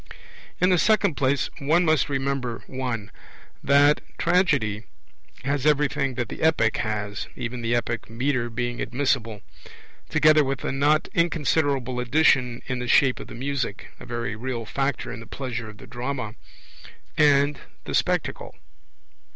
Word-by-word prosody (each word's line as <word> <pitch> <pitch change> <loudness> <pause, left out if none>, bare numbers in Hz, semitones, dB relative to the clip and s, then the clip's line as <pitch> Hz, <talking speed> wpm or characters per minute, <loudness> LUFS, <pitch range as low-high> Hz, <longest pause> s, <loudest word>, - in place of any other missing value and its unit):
In 180 +1 +4
the 180 - +4
second 210 -4 +3
place, 135 0 0
one 160 +5 +2
must 155 -3 +2
remember 135 -3 -2
(1) 125 -6 -4 0.5
that 145 +1 +5 0.2
Tragedy 140 - +1 0.6
has 140 -1 0
everything 145 -2 +1
that 120 -2 -2
the - - -8
Epic 155 -9 +3
has 105 -2 -3
(even 120 +1 -5
the 115 +1 0
epic 115 -1 -2
metre 120 +1 -1
being 120 +1 -3
admissible), 125 -5 -1 0.7
together 155 0 +5
with 135 -1 -3
a - - -1
not 145 +3 +2
inconsiderable 145 -6 +1
addition 125 -2 +2
in 130 -1 -3
the 125 - -4
shape 130 +1 +4
of - - -8
the - - -9
Music 130 -4 -3
(a - - -10
very 120 -3 -3
real 120 0 -4
factor 135 +4 -2
in - - -7
the 115 - -11
pleasure 115 -4 -5
of 105 - -12
the - - -12
drama) 125 -3 -4 0.8
and 145 -1 +4 0.2
the - - -6
Spectacle. - - -1
130 Hz, 145 wpm, -24 LUFS, 120-145 Hz, 0.8 s, that